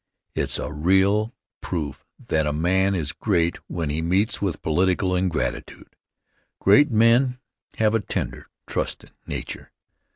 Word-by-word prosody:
It's - - -1
a - - -4
real 95 +7 +3 0.3
proof 75 -6 -4 0.3
that 80 -1 +2
a - - +1
man 95 +5 +2
is 80 -4 -2
great 85 -3 0
when 80 -4 -2
he 80 +2 -1
meets 95 +6 +1
with 90 -6 -2
political 90 +3 +1
ingratitude. 90 -4 -3 0.6
Great 125 +10 +6
men 120 +3 +4 0.4
have 110 -1 +3
a 115 - +3
tender, 100 - -4 0.2
trustin' - - -4 0.2
nature. - - -6
95 Hz, 130 wpm, -24 LUFS, 80-105 Hz, 0.6 s, Great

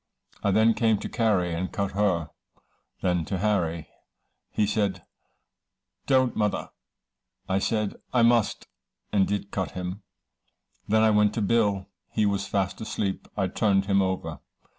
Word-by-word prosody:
I 100 - +1
then 110 +3 +4
came 110 -2 +2
to - - -5
Carry, 100 -7 +1
and 90 +3 -3
cut 100 -2 -2
her. 95 -5 0 0.7
Then 90 -2 +1
to 95 - -2
Harry 90 -5 0 0.6
he 105 - +1
said, 100 -4 -1 1.0
'don't 130 -2 +3
mother.' 105 -1 -1 0.8
I 95 0 +1
said, 105 0 -1
'I 120 -2 +3
must' 115 -2 +2 0.5
and 100 -2 +3
did 100 0 -3
cut 95 -2 -2
him. 90 +3 -5 0.9
Then 110 +1 +3
I 110 - +5
went 105 0 +3
to 115 - 0
Bill. 100 -3 +2 0.2
He 110 - +1
was 100 -1 0
fast 95 0 -1
asleep. 100 -3 -3
I 95 - +2
turned 95 0 +2
him 100 0 +3
over. 95 -1 -2
100 Hz, 145 wpm, -26 LUFS, 95-110 Hz, 1.0 s, I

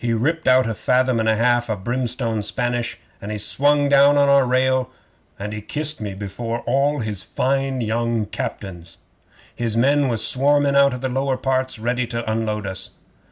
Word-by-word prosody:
He 120 -1 0
ripped 160 +8 -1
out 130 -1 +5
a 115 - -1
fathom 125 +2 +1
and 110 0 +1
a 110 - +3
half 120 +1 +1
o' 110 - 0
brimstone 120 +1 -2
Spanish, 120 +2 -2 0.2
and 105 - -6
he 105 - -3
swung 145 +7 +2
down 140 +1 +5
on 140 0 +4
our 140 -2 +4
rail, 130 0 +1 0.5
and 105 +1 -5
he 105 - -5
kissed 150 +4 -3
me 100 -2 -5
before 115 +4 -5
all 140 +3 0
his 105 -4 -2
fine 135 0 -1
young 115 0 -1
captains. 85 -4 -7 0.6
His 115 -2 -1
men 140 +3 +3
was 115 -3 -1
swarming 140 +1 +2
out 140 -2 +4
of 125 - -8
the 130 - -1
lower 135 +1 -1
ports 130 -1 -1
ready 120 +2 -1
to 115 -1 -3
unload 110 -2 -2
us. 95 -1 -4
120 Hz, 185 wpm, -21 LUFS, 110-135 Hz, 0.6 s, out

